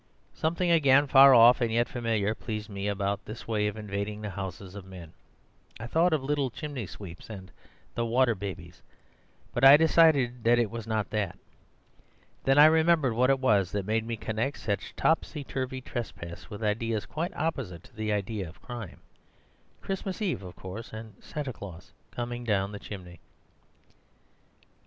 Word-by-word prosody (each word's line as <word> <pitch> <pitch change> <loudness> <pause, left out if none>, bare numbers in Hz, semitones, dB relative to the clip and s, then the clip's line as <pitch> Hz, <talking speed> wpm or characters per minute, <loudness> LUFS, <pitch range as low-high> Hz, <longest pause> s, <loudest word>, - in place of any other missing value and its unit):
Something 170 +2 0
again 140 -3 +5
far 135 -1 +8
off, 120 +2 +7
and 115 -2 +1
yet 120 +1 +2
familiar, 110 -4 -1
pleased 110 -2 -6
me 100 0 -4
about 100 0 -1
this 110 +2 -9
way 105 -2 +1
of 105 +1 -4
invading 105 0 -4
the 105 -1 -5
houses 95 0 -7
of 100 -1 -8
men. 90 -4 -11 0.7
I 115 - -6
thought 165 +8 +2
of 155 -4 +1
little 140 -1 0
chimney 140 - -6
sweeps, 90 +1 -10
and 95 -4 -9 0.4
'The 115 0 -1
Water 120 +1 +3
Babies;' 90 -4 -8 0.7
but 120 - -2
I 135 +2 +10
decided 150 -7 +4
that 120 +1 +4
it 115 -3 +1
was 115 -1 -6
not 110 -2 -1
that. 100 -4 -2 1.1
Then 135 +1 +4
I 150 - +10
remembered 160 -4 +4
what 125 +3 +3
it 135 - +4
was 100 -8 +2
that 100 -2 -2
made 110 +2 0
me 115 0 -4
connect 115 +7 -2
such 100 -2 -3
topsy 160 -2 0
turvy 130 -1 -4
trespass 90 -9 -7
with 105 +2 -7
ideas 110 0 -1
quite 165 +3 -4
opposite 120 - -3
to - - -19
the 110 -1 -2
idea 105 -2 -2
of 80 - -16
crime. 120 -6 -8 0.8
Christmas 195 0 -4
Eve, 200 - -1
of 90 -2 -10
course, 95 +5 -8
and 110 0 -8
Santa 145 -4 -5
Claus 90 -3 -10 0.2
coming 120 0 -5
down 100 -3 0
the 105 - -7
chimney. 90 -5 -9
115 Hz, 170 wpm, -28 LUFS, 100-135 Hz, 1.1 s, I